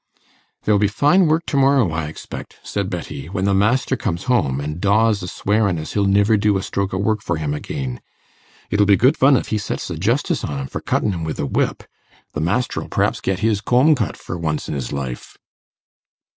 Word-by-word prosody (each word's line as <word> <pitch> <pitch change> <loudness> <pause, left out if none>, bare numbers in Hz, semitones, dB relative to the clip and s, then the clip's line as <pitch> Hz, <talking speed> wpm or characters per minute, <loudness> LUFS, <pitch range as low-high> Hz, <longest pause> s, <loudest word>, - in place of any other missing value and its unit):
'There'll 105 -1 +3
be 105 - +3
fine 150 - +3
work 160 +2 +1
to - - -3
morrow, 135 -8 +4
I 80 -1 -2
expect,' 80 - -9
said 100 -2 -3
Betty, 75 -5 -6
'when 95 0 -2
the 100 - +2
master 105 +7 +2
comes 85 +2 -3
home, 70 - +1
an' 75 +3 -4
Dawes 105 +2 +3
a 90 - -5
swearin' 100 -1 0
as 80 0 -6
he'll 100 -1 +1
niver 100 +2 +4
do 105 -1 +2
a 95 - -3
stroke 100 -1 -2
o' 95 - -2
work 105 +2 0
for 85 - -1
him 75 -2 -2
again. 65 -4 -5 0.7
It'll 100 0 +3
be 100 -2 +6
good 130 +7 +4
fun 135 0 +5
if - - -4
he 110 - 0
sets 100 - -4
the 85 - -4
justice 115 - 0
on 70 - -3
him 70 - -3
for - - -6
cuttin' - - 0
him 85 -3 -4
wi' 80 -1 -2
the - - -3
whip; 70 - -1 0.5
the 75 - -3
master'll 105 +10 -1
p'raps - - 0
get 95 +2 -1
his 110 -2 +1
comb 130 +8 +4
cut 120 -8 -2
for 85 - -6
once 80 -2 -2
in - - -3
his 65 -4 -4
life! 65 -3 -5
100 Hz, 215 wpm, -20 LUFS, 80-110 Hz, 0.7 s, be